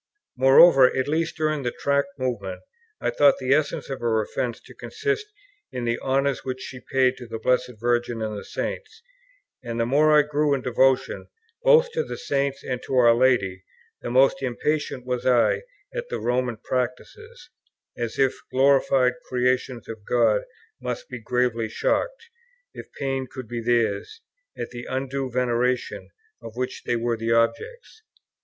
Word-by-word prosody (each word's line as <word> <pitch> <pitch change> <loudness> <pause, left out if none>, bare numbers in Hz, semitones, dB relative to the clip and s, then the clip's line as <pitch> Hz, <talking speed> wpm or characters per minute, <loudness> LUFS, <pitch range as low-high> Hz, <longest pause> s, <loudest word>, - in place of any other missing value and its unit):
Moreover, 135 +1 +7
at 130 - 0
least 160 +2 -1
during 155 -2 0
the 125 - -1
Tract 140 +5 0
Movement, 115 -8 -3 0.4
I - - -1
thought 145 -1 +4
the 130 0 +1
essence 145 0 0
of 135 - -5
her 115 -2 +1
offence 115 +2 -3
to - - -15
consist 430 -1 -3 0.4
in 125 -1 -4
the 115 0 0
honours 135 0 0
which 130 0 -4
she 130 - -8
paid 130 -1 +3
to 125 - -10
the 115 0 -5
Blessed 125 +2 0
Virgin 120 0 0
and 110 -1 -3
the 100 - -6
Saints; 455 0 -6 0.6
and 115 -1 -4
the 115 - +2
more 150 +4 +4
I 150 - +6
grew 150 0 +1
in 130 - -5
devotion, 130 +1 +1 0.3
both - - +5
to 475 +1 -1
the - - -7
Saints 140 - -2
and 125 -1 -3
to 135 - -4
our 120 -2 +6
Lady, 115 -7 +2 0.4
the - - -5
more 130 +3 +5
impatient 135 +1 -2
was 125 -1 -2
I 125 -2 +3 0.3
at - - -5
the - - -2
Roman 125 -1 -1
practices, 295 - -5 0.4
as 120 -2 -4
if 135 -1 +3
those - - -18
glorified 135 -1 +3 0.2
creations 125 -1 0
of 110 -2 -8
God 310 - +2 0.4
must - - -5
be - - -6
gravely 125 -3 0
shocked, 470 - -2 0.4
if - - -10
pain 135 -1 -3
could 130 -3 -8
be 120 +1 -4
theirs, 115 - 0 0.4
at - - -5
the 120 -1 -8
undue 135 0 -3
veneration 125 0 -1 0.3
of 115 - -10
which 125 +1 -4
they 120 - 0
were 115 0 -1
the 115 +1 0
objects. 445 - -1
130 Hz, 165 wpm, -24 LUFS, 120-140 Hz, 0.6 s, Moreover